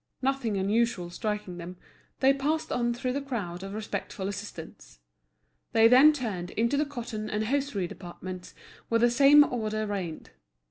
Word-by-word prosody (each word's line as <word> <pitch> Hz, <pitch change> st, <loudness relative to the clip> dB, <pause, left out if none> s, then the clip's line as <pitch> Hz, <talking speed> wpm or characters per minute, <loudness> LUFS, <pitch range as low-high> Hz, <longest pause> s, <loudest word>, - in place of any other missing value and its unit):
Nothing 260 Hz, -6 st, 0 dB
unusual 200 Hz, -2 st, 0 dB
striking 210 Hz, -3 st, -4 dB
them, 175 Hz, +2 st, -8 dB, 0.4 s
they 270 Hz, +1 st, +6 dB
passed 300 Hz, +4 st, -1 dB
on 240 Hz, -1 st, +1 dB
through 250 Hz, +1 st, -2 dB
the 280 Hz, -, -2 dB
crowd 205 Hz, -11 st, -4 dB
of 195 Hz, +1 st, -6 dB
respectful 205 Hz, -2 st, -4 dB
assistants. 200 Hz, -, -8 dB, 0.8 s
They 225 Hz, 0 st, +7 dB
then 260 Hz, +6 st, +8 dB
turned 215 Hz, -12 st, -4 dB
into 235 Hz, +5 st, 0 dB
the 295 Hz, +1 st, +1 dB
cotton 230 Hz, -6 st, -5 dB
and 215 Hz, +1 st, -1 dB
hosiery 270 Hz, -6 st, -1 dB
departments, 180 Hz, 0 st, -9 dB, 0.3 s
where 230 Hz, -, +3 dB
the 240 Hz, +1 st, +4 dB
same 280 Hz, +4 st, +7 dB
order 215 Hz, -5 st, -2 dB
reigned. 190 Hz, -6 st, -5 dB
225 Hz, 150 wpm, -28 LUFS, 195-260 Hz, 0.8 s, then